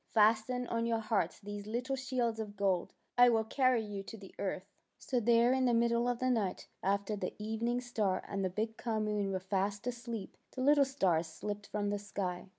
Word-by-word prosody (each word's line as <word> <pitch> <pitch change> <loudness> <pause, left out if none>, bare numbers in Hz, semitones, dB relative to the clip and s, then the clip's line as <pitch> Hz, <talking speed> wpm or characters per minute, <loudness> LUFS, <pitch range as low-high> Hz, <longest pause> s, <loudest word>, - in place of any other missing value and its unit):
'' - - -44
Fasten 225 +3 +4
on 230 -1 -1
your 230 -1 +2
hearts 215 -6 0
these 205 0 -7
little 245 +5 -1
shields 250 -4 -1
of 205 -2 -5
gold. 190 -3 +1 0.3
I 245 0 +9
will 225 -2 +3
carry 255 0 +2
you 205 -2 -5
to 210 +3 -9
the 195 -2 -12
earth." 190 -1 -2 0.3
So 255 - -1
there 235 +2 +4
in 260 0 +2
the 240 -2 +3
middle 235 +1 +2
of 245 - 0
the 255 +1 +1
night, 210 -6 -1
after 200 +2 0
the 205 - -4
evening 225 +3 -1
star 215 -6 0
and 195 -1 -2
the 185 - +1
big 220 +4 -3
calm 220 -2 -1
moon 205 -2 0
were 190 - -1
fast 195 +2 -1
asleep, 235 -4 -5 0.2
the 260 - -3
little 285 0 +6
stars 180 - +1
slipped 205 +6 -5
from 205 -1 -1
the 205 - -1
sky. 195 -2 -4
220 Hz, 210 wpm, -33 LUFS, 200-240 Hz, 0.3 s, I